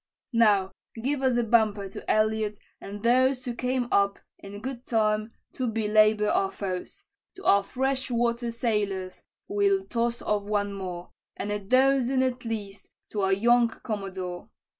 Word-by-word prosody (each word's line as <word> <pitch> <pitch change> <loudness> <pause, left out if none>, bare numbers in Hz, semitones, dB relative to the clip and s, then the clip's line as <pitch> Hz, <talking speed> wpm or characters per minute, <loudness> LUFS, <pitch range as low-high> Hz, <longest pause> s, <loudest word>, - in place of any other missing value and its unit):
"Now 205 -5 +4 0.3
give 270 +4 -1
us 260 -2 +2
a 240 - +2
bumper 215 -3 +2
to - - -9
Elliott 215 -1 +1 0.2
and 205 +1 -8
those 255 +2 +3
Who 245 - -2
came 250 0 -1
up, 200 0 +3 0.2
in 200 +1 -9
good 255 +1 -6
time, 215 -2 0 0.2
to 255 - -2
belabor 215 -1 +3
our 195 -2 +1
foes: 195 - -5 0.3
To 385 - -12
our 200 - +5
fresh 260 +5 -2
water 235 0 0
sailors 210 -5 -2 0.3
we'll 400 -1 +1
toss 235 -3 -1
off 210 -1 0
one 205 0 -1
more, 180 -3 -6 0.3
And 205 - -3
a 210 - -1
dozen, 260 +4 +3
at 255 -1 -2
least, 210 -3 -5 0.2
to 210 - -2
our 195 0 +2
young 240 +4 +4
commodore. 190 -6 -6
220 Hz, 155 wpm, -27 LUFS, 200-250 Hz, 0.3 s, our